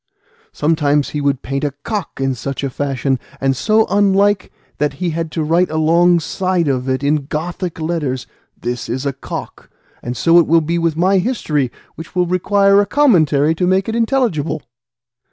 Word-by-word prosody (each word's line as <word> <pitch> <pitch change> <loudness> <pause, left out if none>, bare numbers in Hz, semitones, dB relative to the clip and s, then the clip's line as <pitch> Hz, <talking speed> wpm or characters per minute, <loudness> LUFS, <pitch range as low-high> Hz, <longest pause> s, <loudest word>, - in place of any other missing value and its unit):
Sometimes 150 - +1
he 150 - -3
would 140 -2 0
paint 135 +2 -3
a 145 -2 -2
cock 210 -10 -4
in 135 0 0
such 135 +3 -5
a 135 - -2
fashion, 135 -1 -1 0.2
and 135 0 +1
so 215 - +2
unlike, 200 0 +2 0.3
that 150 -1 0
he 170 +4 -2
had 165 0 -3
to 160 - -1
write 170 +4 +2
alongside 170 +2 +2
of 130 -1 -1
it 130 +1 -1
in 145 -1 0
Gothic 170 +3 -4
letters, 155 -6 -2 0.3
'This 120 0 -4
is 130 +4 -3
a 140 - -1
cock;' 135 - -8 0.3
and 120 0 -5
so 170 +1 +5
it 170 - +2
will 165 +2 +5
be 170 +2 -1
with 165 -2 0
my 190 +3 +3
history, 155 - -1 0.2
which 165 +2 -11
will 180 -1 +2
require 195 +3 +3
a 205 - -1
commentary 160 - +3
to 180 +2 -1
make 190 +1 +2
it 225 - -2
intelligible." 225 - 0
160 Hz, 175 wpm, -17 LUFS, 140-185 Hz, 0.3 s, so